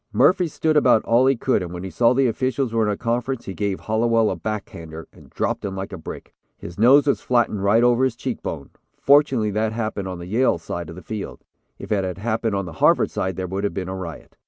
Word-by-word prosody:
"Murphy 180 -1 +3
stood 155 0 -1
about 125 -6 +4
all 120 +3 +4
he 135 - +4
could 125 -2 0
and 90 -2 -5
when 90 0 -6
he 95 - -6
saw 115 +8 +3
the 135 +1 +2
officials 130 0 -1
were 115 -1 +2
in - - +1
a 100 - -3
conference 120 +2 -2
he 95 - -5
gave 100 -1 -2
Hallowell 115 0 +1
a - - -2
back 105 +4 -4
hander, 80 -1 -9
and - - -17
dropped - - -2
him 95 -1 -4
like 95 +1 -6
a - - -5
brick. 80 - -9 0.2
His 85 +3 -10
nose 135 +5 +6
was 140 - +1
flattened 120 -5 +1
right 110 +4 +4
over 120 +1 +3
his 130 -3 +1
cheek 125 0 -4
bone. 70 -4 -6 0.3
Fortunately 135 -7 +3
that 110 +2 -1
happened 110 -4 -3
on 90 -1 -5
the 85 - -8
Yale 115 +3 +2
side 85 0 -6
of 85 - -9
the 90 - -11
field. 110 -3 -6 0.3
If - - -10
it 100 -2 +1
had 90 -2 -4
happened 110 0 -1
on 100 -1 -2
the 85 - -8
Harvard - - +4
side, 95 -1 -2
there 95 - -3
would 95 +2 -4
have 100 - -2
been 95 -2 -4
a 95 - -4
riot. 85 -4 -8
110 Hz, 255 wpm, -22 LUFS, 95-120 Hz, 0.3 s, nose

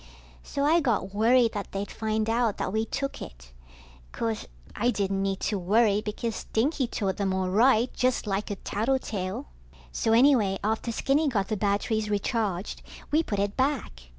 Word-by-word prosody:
So 280 - -3
I 325 +3 +5
got 215 - 0
worried 230 +2 +4
that 205 -2 -5
they'd 195 +1 -4
find 220 0 -1
out 230 -2 +1
that 185 - -3
we 220 +1 +1
took 275 +4 -4
it. - - -10 0.6
Course, 225 -2 -3 0.3
I 240 +3 +1
didn't 195 -4 0
need 195 -1 -1
to 205 -2 -1
worry, 210 +3 +3
because 220 +1 -3
Stinky 260 +3 0
told 195 -4 -2
them 195 -2 0
all 185 -1 -1
right, 235 +3 +4
just 255 -1 0
like 200 0 -2
a 205 - -2
tattletale. 210 -3 -2 0.5
So 225 - +1
anyway, 230 -6 +4
after 220 +2 -1
Skinny 280 +6 +1
got 205 -8 0
the 215 - 0
batteries 210 +2 0
recharged, 205 -2 -1 0.3
we 310 +2 +4
put 210 -10 -3
it 200 +1 -1
back. 255 - -2
215 Hz, 170 wpm, -27 LUFS, 195-240 Hz, 0.6 s, I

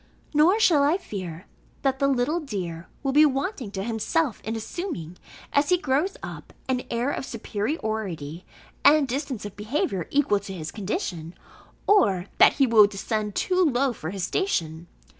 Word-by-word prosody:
Nor 330 +8 +5
shall 330 -9 +5
I 295 +5 +3
fear, 185 - -7 0.4
that 270 -1 +1
the 275 - +3
little 275 +5 +1
dear 180 - -5 0.2
will 270 - +1
be 295 +3 +6
wanting 275 - 0
to 190 -1 -3
himself 235 - -1
in 220 +1 -3
assuming, 220 - -5 0.4
as 285 0 +3
he 360 - +5
grows 305 +4 0
up, - - -8
an 255 -1 0
air 240 +4 0
of - - -3
superiority 210 - -4 0.4
and 295 -1 +6
distance 260 -3 -3
of 205 - -7
behaviour 210 - -2
equal 280 -8 +2
to 200 -1 -8
his 160 -4 -6
condition, 185 - -4 0.5
or 200 - +4
that - - +8
he 275 - +3
will 220 -4 +7
descend 210 +1 -3
too 370 0 +2
low 270 -4 +2
for 160 -7 -6
his 190 -1 -4
station. 170 - -1
235 Hz, 160 wpm, -25 LUFS, 195-295 Hz, 0.5 s, that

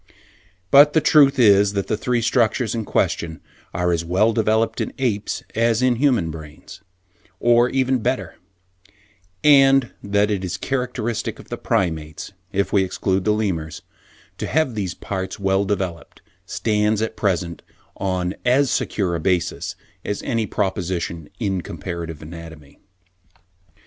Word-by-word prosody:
But 145 +2 +7
the 160 - +5
truth 145 -3 +5
that 100 -5 +4
the - - -1
three 120 +2 -1
structures 115 -1 +1
in 115 -2 -3
question 80 -4 -1 0.3
are 90 0 0
as 85 -1 0
well 95 +7 +2
developed 110 +1 +1
in - - -3
apes' 110 -6 -2
as 115 +1 +2
in 125 -2 +3
human 120 - +2
brains, 80 +3 -11 0.6
or 120 +1 +4
even 130 -1 +1
better; 110 -7 -2 1.1
and 135 -3 +5
that 100 +1 +1
it 100 -2 -1
is 90 -1 -3
characteristic 125 -2 -3
of - - -13
all - - -25
the - - -3
Primates 80 -2 -2 0.2
(if 100 0 -1
we 100 -2 +4
exclude 95 0 -1
the 105 - +3
Lemurs) 95 -8 -2 0.6
to - - -3
have 155 -5 +1
these 95 -5 -3
parts 95 +1 -5
well 95 0 +1
developed, 95 -4 -4 0.2
stands 105 -1 0
at 110 0 -3
present 90 -4 -1 0.3
on 95 -2 -2
as 130 +2 +3
secure 95 -5 -1
a 85 - -1
basis 90 +1 -1 0.3
as 105 - -4
any 115 -2 -1
proposition 90 -5 -2
in 95 -5 -1
comparative 85 -2 -6
anatomy. 80 -3 -11
100 Hz, 140 wpm, -21 LUFS, 90-120 Hz, 1.1 s, But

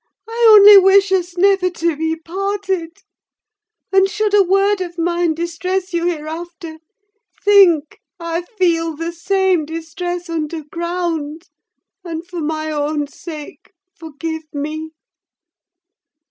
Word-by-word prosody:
I 460 +1 +2
only 410 0 +10
wish 385 +1 +4
us 360 -2 -1
never 385 0 +3
to 335 -2 -2
be 320 +2 -2
parted: 380 0 -4 0.9
and 385 0 +4
should 420 0 -1
a 415 - +6
word 390 +1 +2
of 350 -1 -6
mine 340 -1 0
distress 365 +3 -3
you 340 0 0
hereafter, 330 0 -6 0.6
think 365 -7 +4 0.2
I 335 0 -3
feel 340 -5 -1
the 330 +2 -4
same 375 0 0
distress 345 +3 -5
underground, 330 0 -4 0.5
and 335 -1 -6
for 350 -1 -6
my 310 0 -3
own 295 0 -1
sake, 305 +5 -11 0.2
forgive 320 -2 -7
me! 305 +2 -5
340 Hz, 115 wpm, -18 LUFS, 320-380 Hz, 0.9 s, only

